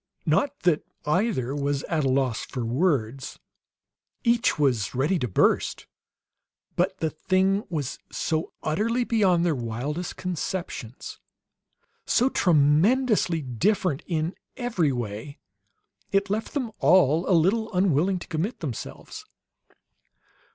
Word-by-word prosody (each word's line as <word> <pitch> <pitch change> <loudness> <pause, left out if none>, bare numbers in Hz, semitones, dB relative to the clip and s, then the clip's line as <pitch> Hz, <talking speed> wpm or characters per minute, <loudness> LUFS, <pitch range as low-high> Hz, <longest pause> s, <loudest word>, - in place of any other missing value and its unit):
Not 260 - +1
that 170 -4 +2 0.2
either 150 - 0
was 145 -1 -1
at 160 -3 -1
a 135 - +2
loss 130 -3 +1
for 125 -3 -4
words; 130 -2 0 0.9
each 235 -1 +2
was 130 -7 +1
ready 150 +8 +1
to 125 - -1
burst. 100 - +1 0.9
But 185 +2 0
the 160 -3 -1
thing 190 +5 +1
was 145 -6 -3
so 160 0 -2
utterly 225 +10 0
beyond 190 -7 +2
their 170 - +2
wildest 130 +7 -4
conceptions, 175 -8 -5 0.9
so 250 +2 +3
tremendously 175 - +3
different 155 - 0
in 165 0 -1 0.2
every 220 - 0
way, 120 +3 -5 0.7
it 195 0 +1
left 220 +7 -2
them 255 -6 -1
all 170 -1 +4
a 180 - +5
little 215 +7 +1
unwilling 185 -1 +2
to 175 - -9
commit 180 +8 -2
themselves. 135 -9 -7
165 Hz, 115 wpm, -25 LUFS, 140-195 Hz, 0.9 s, a